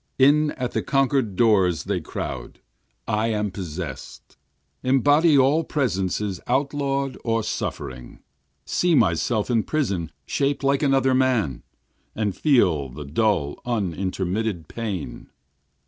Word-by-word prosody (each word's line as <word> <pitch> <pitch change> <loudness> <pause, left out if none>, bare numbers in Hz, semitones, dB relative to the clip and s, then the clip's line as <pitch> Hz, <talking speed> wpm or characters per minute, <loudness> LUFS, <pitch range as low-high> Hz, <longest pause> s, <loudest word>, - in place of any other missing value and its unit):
In 150 +3 +5
at 125 -1 -3
the - - -1
conquerâd 135 -6 +1
doors 95 -7 +3
they - - -2
crowd! - - -6 0.5
I 110 0 +1
am 105 -2 -1
possessâd! 85 -6 -7 0.5
Embody 145 +4 +4
all 140 +5 +4
presences 100 - -1
outlawâd 140 0 -1
or 115 -1 0
suffering, 65 -10 -5 0.5
See 175 -2 +2
myself 105 - +1
in 115 -2 +3
prison 100 - -2
shaped 140 0 -1
like 140 0 +2
another 135 -2 +3
man, 125 - +1 0.5
And 105 -4 -1
feel 90 - +2
the 70 +4 -8
dull 80 -2 0
unintermitted 95 -2 -2
pain. 105 -8 -5
110 Hz, 115 wpm, -23 LUFS, 90-135 Hz, 0.5 s, In